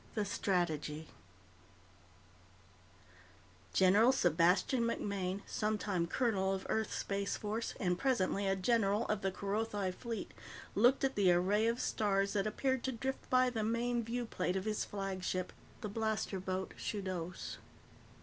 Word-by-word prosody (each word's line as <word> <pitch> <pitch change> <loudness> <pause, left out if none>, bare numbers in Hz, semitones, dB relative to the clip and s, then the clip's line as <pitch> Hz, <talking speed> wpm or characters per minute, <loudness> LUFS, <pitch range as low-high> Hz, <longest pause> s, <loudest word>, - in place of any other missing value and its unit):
The 210 -2 0
Strategy 160 -6 -1 2.6
General 205 +6 +5
Sebastian 180 - +3
MacMaine, 200 -4 -2
sometime 210 -5 -1
Colonel 195 -3 +1
of 190 - -6
Earth's 220 -1 0
Space 200 0 -2
Force, 215 +2 -3
and 180 -1 0
presently 200 -6 +1
a 195 - +2
General 205 +1 +2
of 215 -1 0
the 195 - 0
Kerothi 205 0 -1
Fleet, 230 +2 -5 0.4
looked 245 +7 +4
at 270 0 +2
the 195 -3 +4
array 195 +5 +3
of 235 +1 0
stars 200 -4 +1
that 205 0 +1
appeared 260 +3 0
to 260 - 0
drift 265 +3 -4
by 255 0 +4
the 225 -3 -1
main 235 +2 0
viewplate 230 -5 -2
of 190 +1 -2
his 215 -1 0
flagship, 190 -2 -3 0.3
the 215 - -3
blaster 215 -2 -1
boat 185 0 -3
Shudos. 185 -4 -4
205 Hz, 130 wpm, -35 LUFS, 190-230 Hz, 2.6 s, General